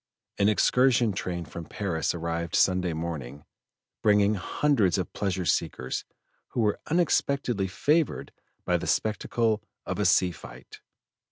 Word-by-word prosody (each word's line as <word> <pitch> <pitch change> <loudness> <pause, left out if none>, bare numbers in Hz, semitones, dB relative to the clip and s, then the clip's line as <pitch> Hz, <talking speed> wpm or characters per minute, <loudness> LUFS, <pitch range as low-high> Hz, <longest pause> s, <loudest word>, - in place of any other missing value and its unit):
An 100 - +4
excursion 120 +1 +3
train 90 -3 -4
from 80 +2 -8
Paris 90 -4 -2
arrived 85 0 -3
Sunday 90 -2 +3
morning, 75 -4 -5 0.6
bringing 105 0 +4
hundreds 105 - +1
of 95 - -3
pleasure 95 -3 -2
seekers 65 -5 -1 0.4
who 120 - -2
were 105 -2 +1
unexpectedly 140 - +1
favored 150 - 0 0.3
by - - +2
the - - -5
spectacle 110 0 0 0.2
of - - -3
a 105 - +1
sea 90 -1 +4
fight. 65 -5 -12
95 Hz, 125 wpm, -27 LUFS, 85-110 Hz, 0.6 s, An